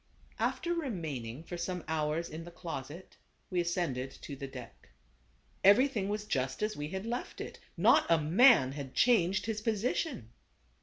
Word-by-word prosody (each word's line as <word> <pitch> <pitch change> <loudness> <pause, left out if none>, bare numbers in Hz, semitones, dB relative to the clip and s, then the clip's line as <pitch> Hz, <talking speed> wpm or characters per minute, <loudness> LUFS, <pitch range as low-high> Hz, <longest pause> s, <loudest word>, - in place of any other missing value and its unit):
After 345 - 0
remaining 160 - -4
for 175 +1 -6
some 180 0 -3
hours 160 +1 -1
in 160 +1 -7
the 175 - -9
closet, 170 -1 -8 0.3
we 180 -1 +2
ascended 170 -7 -1
to 140 - -6
the 140 0 -6
deck. 130 -2 -11 0.7
Everything 205 0 +5
was 210 0 -2
just 130 -5 -1
as 215 0 -1
we 145 0 -4
had 190 +5 -5
left 240 +2 -4
it. - - -7 0.2
Not - - +5
a 165 - +6
man 165 - +6
had 135 -2 -7
changed 190 -6 +3
his 215 -1 -2
position. 220 - -1
175 Hz, 155 wpm, -32 LUFS, 145-210 Hz, 0.7 s, a